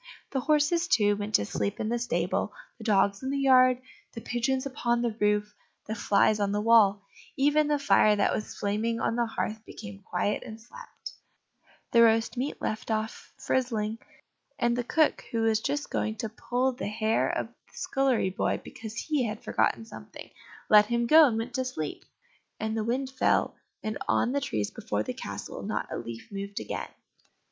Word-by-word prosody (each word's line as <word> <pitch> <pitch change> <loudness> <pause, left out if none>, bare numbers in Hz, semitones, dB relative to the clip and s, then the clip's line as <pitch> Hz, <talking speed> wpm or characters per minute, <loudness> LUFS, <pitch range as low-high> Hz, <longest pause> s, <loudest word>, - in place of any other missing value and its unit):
The 270 - 0
horses, 305 +5 +2
too, 205 - +3
went 205 +1 -2
to 100 - +3
sleep 100 0 -2
in 215 - -1
the 240 +1 0
stable, 240 - -1 0.3
the - - -9
dogs 200 -2 +2
in 265 - -3
the 280 - -1
yard, 255 -2 +5 0.3
the 230 - -7
pigeons 260 +3 -1
upon 240 -3 0
the 235 -3 -1
roof, 210 0 +1 0.3
the 215 - -4
flies 210 0 +3
on 200 -1 +1
the 205 - +1
wall; 210 -2 +5 0.3
even 295 +2 +3
the 295 -1 +2
fire 245 -6 +4
that 200 - +2
was 215 - -4
flaming 220 +3 -1
on - - 0
the 235 -1 +1
hearth 220 0 -3
became 200 -3 -10
quiet 190 +2 -1
and 220 0 -9
slept, 365 - -11 0.8
the 235 - +6
roast 225 +1 +4
meat 260 +4 -3
left 215 - -3
off 220 0 -3
frizzling, 230 -5 -1 0.6
and 235 0 +1
the 245 - -1
cook, 310 +5 +1
who 230 - 0
was 220 -1 +3
just 290 +4 -2
going 215 - -1
to 225 0 -4
pull 250 +4 -1
the 250 -3 -5
hair 220 +1 +1
of - - -1
the - - -28 0.2
scullery 265 -8 +1
boy, 190 - -1
because 220 -1 -9
he 290 0 0
had 215 0 -6
forgotten 225 - 0
something, 225 - -11 0.4
let 210 -1 +7
him 235 +1 +1
go, 310 +5 +8
and 225 -4 -1
went 230 +2 -4
to 260 - 0
sleep. 155 - -5 0.6
And 220 0 -2
the 220 - -1
wind 260 +4 -1
fell, 265 - +1 0.3
and 215 0 -3
on 245 - +2
the 280 +1 0
trees 105 - -2
before 105 +1 -2
the - - -4
castle - - -7
not - - -3
a - - -2
leaf 115 - -8
moved 200 0 -5
again. - - -5
225 Hz, 190 wpm, -28 LUFS, 210-255 Hz, 0.8 s, go